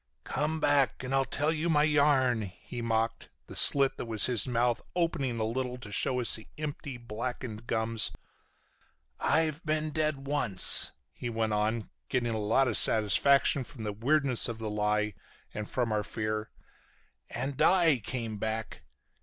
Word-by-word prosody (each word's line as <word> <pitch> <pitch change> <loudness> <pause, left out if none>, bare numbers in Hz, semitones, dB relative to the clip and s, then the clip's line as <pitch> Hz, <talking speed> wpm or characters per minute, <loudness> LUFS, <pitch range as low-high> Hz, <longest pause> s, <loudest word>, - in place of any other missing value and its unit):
"Come 155 +2 -2
back 145 -3 +1
and 130 +1 -4
I'll 135 0 +2
tell 145 +4 -1
you 165 +2 -2
my 150 -2 +3
yarn," 140 -6 +2
he 105 +5 -8
mocked, 115 0 -2 0.2
the - - -11
slit 140 -1 +6
that - - -6
was 110 -3 +5
his 125 0 +3
mouth 120 -1 0
opening 165 -8 -1
a - - 0
little 125 +3 -3
to 110 -4 -11
show 125 +4 0
us 120 - +4
the 110 - -4
empty, 145 -3 -6
blackened 120 0 -6
gums. 110 0 -1 1.1
"I've 160 0 0
been 155 0 -2
dead 150 -3 -2
once," 135 -10 +5 0.2
he 120 - -6
went 110 -1 -2
on, 110 +2 -2 0.2
getting 120 -2 -1
a 110 - -2
lot 115 +6 +2
of 115 - +2
satisfaction 135 +6 +3
from 120 -2 -11
the 105 -1 -4
weirdness 130 +3 +2
of 115 - -5
the 110 -1 -5
lie 105 0 -1 0.4
and 105 0 -6
from 120 -3 -2
our 105 -1 0
fear, 110 +1 -4 0.8
"and 130 +3 -4
I 170 -7 +4
came 115 -1 -5
back. 110 +1 -5
120 Hz, 160 wpm, -29 LUFS, 110-140 Hz, 1.1 s, slit